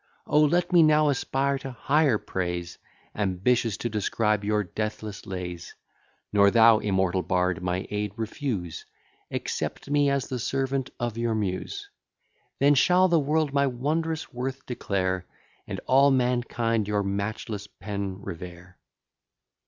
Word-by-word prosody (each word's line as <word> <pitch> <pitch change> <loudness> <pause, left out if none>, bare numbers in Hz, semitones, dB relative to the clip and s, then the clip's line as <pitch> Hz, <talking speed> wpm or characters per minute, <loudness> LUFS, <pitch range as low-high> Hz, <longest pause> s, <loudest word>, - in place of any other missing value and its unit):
O 150 - +3
let 170 +5 +2
me 175 - +8
now 155 -1 +5
aspire 140 0 0
to 135 - -6
higher 140 0 +2
praise! 90 -3 -4 0.3
Ambitious 105 +3 +1
to 120 - -2
transcribe 105 -1 0
your 105 0 +1
deathless 105 +1 -5
lays: 90 -3 -6 0.6
Nor 100 -1 +6
thou, 115 0 +6
immortal 95 -3 +1
bard, 90 -2 0
my 90 +1 -2
aid 105 -1 -2
refuse, 110 - -4 0.4
Accept 140 - -4
me 145 -1 +3
as 140 -1 0
the 125 - -3
servant 135 +1 -1
of 120 -1 -2
your 115 -1 0
Muse; 105 - -3 0.7
Then 145 +1 +5
shall 180 +6 +4
the 170 -1 +4
world 150 0 0
my 140 0 +3
wondrous 155 +6 -2
worth 130 +2 -4
declare, 95 -6 -2 0.4
And - - -4
all 135 +2 +5
mankind 120 -4 +1
your 105 -1 0
matchless 100 +1 -3
pen 100 0 -5
revere. 90 +1 -9
115 Hz, 135 wpm, -26 LUFS, 100-140 Hz, 0.7 s, me